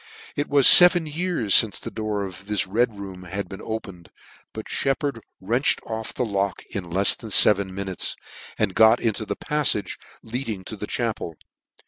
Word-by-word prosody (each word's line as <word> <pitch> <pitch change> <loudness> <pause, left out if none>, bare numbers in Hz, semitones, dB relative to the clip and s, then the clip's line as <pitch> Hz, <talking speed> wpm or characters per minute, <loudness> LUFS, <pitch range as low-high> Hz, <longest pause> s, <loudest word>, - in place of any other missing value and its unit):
It 145 0 -3
was 140 -2 +4
feven 175 -1 +8
years 155 - +2
fince 110 -3 -2
the - - -8
door 105 -2 -3
of 95 +1 -11
this 105 -2 -1
Red 110 +3 -1
room 95 -2 -9
had 95 +3 -5
been 95 - -10
opened: 95 -6 -7 0.4
but - - -8
Sheppard 135 -3 -2 0.2
wrenched 120 +8 0
off 110 -1 -5
the 125 - -3
lock 100 -3 -2
in 95 -5 -5
lefs 95 +4 +4
than 110 - -10
feven 100 -1 +4
minutes, 95 -1 -4 0.4
and 105 -3 0
got 110 +3 +5
into 110 -1 -2
the - - -3
pafltge 150 -9 -2 0.2
leading 115 -4 -5
to 110 - -7
the 105 0 -7
chapel. 110 -8 -3
110 Hz, 170 wpm, -23 LUFS, 95-120 Hz, 0.4 s, feven